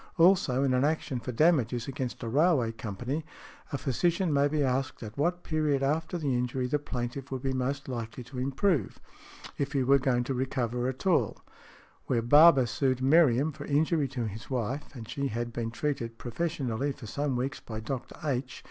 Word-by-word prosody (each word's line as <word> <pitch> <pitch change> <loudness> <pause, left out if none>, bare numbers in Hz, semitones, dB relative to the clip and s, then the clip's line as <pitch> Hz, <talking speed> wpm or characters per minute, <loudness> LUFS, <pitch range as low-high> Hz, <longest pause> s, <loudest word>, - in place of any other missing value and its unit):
Also, 165 -7 +4
in 135 -2 +2
an 125 +1 +2
action 150 -3 0
for 125 - -5
damages 125 -4 +2
against 130 -2 -4
a - - -3
railway 140 -2 +3
company, 120 +7 -4 0.5
a 140 - -1
physician 170 - 0
may 140 0 +4
be 150 0 0
asked 130 -1 -1
at 110 0 -8
what 175 +4 0
period 150 -4 0
after 160 +5 0
the 145 -5 -1
injury 125 +1 -1
the 145 +4 0
plaintiff 130 -1 -5
would 130 -1 -4
be 135 -1 0
most 135 +2 -2
likely 120 -1 -5
to 125 +1 -8
improve, 135 - 0 0.6
if 140 0 -1
he 135 -2 +2
were 140 +2 +5
going 125 -2 +1
to 135 - -2
recover 125 -1 -1
at 130 +7 -5
all. 185 -3 +2 0.7
Where 120 -3 +1
Barber 145 +1 +7
sued 130 +2 0
Meriam 140 0 +4
for 145 -1 -9
injury 150 0 +2
to 125 -3 -3
his 110 +1 -7
wife, 130 +2 -2
and 115 -3 -8
she 140 +2 -2
had 120 0 -3
been 115 -1 -2
treated 115 -2 -3
professionally 135 -1 -2
for 135 -3 -11
some 140 +4 -2
weeks 130 +4 -2
by 110 -2 -7
Dr. 125 +3 -5
H. 130 -3 -2
135 Hz, 185 wpm, -29 LUFS, 120-145 Hz, 0.7 s, Barber